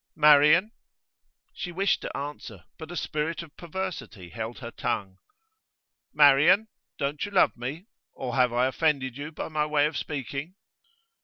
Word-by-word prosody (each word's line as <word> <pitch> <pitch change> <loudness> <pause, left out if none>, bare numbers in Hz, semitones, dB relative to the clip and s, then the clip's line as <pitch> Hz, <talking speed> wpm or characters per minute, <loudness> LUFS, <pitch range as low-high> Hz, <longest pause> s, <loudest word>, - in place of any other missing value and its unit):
'Marian?' 150 +6 +6 0.8
She 175 - -6
wished 195 +3 +1
to - - -5
answer, 140 -9 -7 0.2
but 160 -1 -8
a 175 - -5
spirit 155 +2 -2
of 155 -3 -16
perversity 170 - -6
held 115 +5 -6
her 120 -2 -8
tongue. 95 -4 -3 0.9
'Marian, 150 +9 +5 0.3
don't 140 +1 -2
you - - -3
love 195 - +4
me? 135 +9 -6 0.3
Or 125 -2 -5
have 125 -2 +3
I 120 +1 +2
offended 130 -2 0
you 145 +3 -6
by 160 - -6
my 150 -1 0
way 150 -1 +3
of 155 - -2
speaking? 140 - -5
150 Hz, 150 wpm, -27 LUFS, 130-165 Hz, 0.9 s, Marian